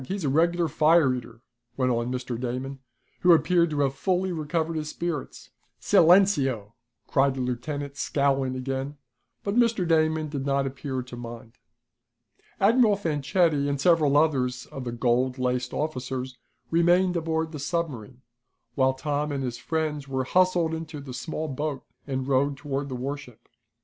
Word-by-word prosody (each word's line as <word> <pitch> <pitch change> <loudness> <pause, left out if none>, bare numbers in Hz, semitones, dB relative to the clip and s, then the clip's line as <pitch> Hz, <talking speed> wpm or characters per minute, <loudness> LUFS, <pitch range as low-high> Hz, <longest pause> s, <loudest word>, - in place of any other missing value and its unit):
He's 195 -2 -3
a 140 - +1
regular 170 +4 +2
fire 155 -2 +4
eater!" 120 -2 -7 0.4
went 130 -1 +2
on 120 +1 -1
Mr. 125 -2 -4
Damon, 130 +2 -4 0.4
who 180 -1 +6
appeared 170 +2 +3
to 150 -2 -1
have 135 -1 +1
fully 185 +5 0
recovered 165 0 -2
his 155 -1 -3
spirits. 170 -5 -5 0.3
"Silenceo!" 145 - +4 0.3
cried 135 -1 +2
the 130 - -3
lieutenant, 140 +3 -4
scowling 135 -2 0
again, 135 +2 -4 0.5
but 200 - -1
Mr. 230 -7 +2
Damon 155 -1 +2
did 140 -2 -4
not 140 0 +1
appear 135 -1 -4
to 125 0 -10
mind. 115 -1 -9 1.0
Admiral 220 +1 +5
Fanchetti 150 -3 +1
and 140 -1 -1
several 150 -2 +4
others 130 -5 +1
of 135 -2 -8
the 120 - -3
gold 125 +2 +1
laced 125 -1 -1
officers 130 -3 -3 0.4
remained 175 +2 +3
aboard 160 -1 -1
the 150 - -6
submarine, 135 - -4 0.5
while 130 +1 +2
Tom 145 +2 -2
and 140 -1 -2
his 125 -2 -4
friends 155 -3 -2
were 130 -1 -1
hustled 180 +2 +2
into 160 -2 -5
the 135 -2 -8
small 160 +3 -4
boat 145 0 -3 0.2
and 130 -1 -2
rowed 140 +1 +1
toward 140 -1 -3
the 130 - -4
warship. 135 -1 -6
140 Hz, 155 wpm, -26 LUFS, 130-160 Hz, 1.0 s, who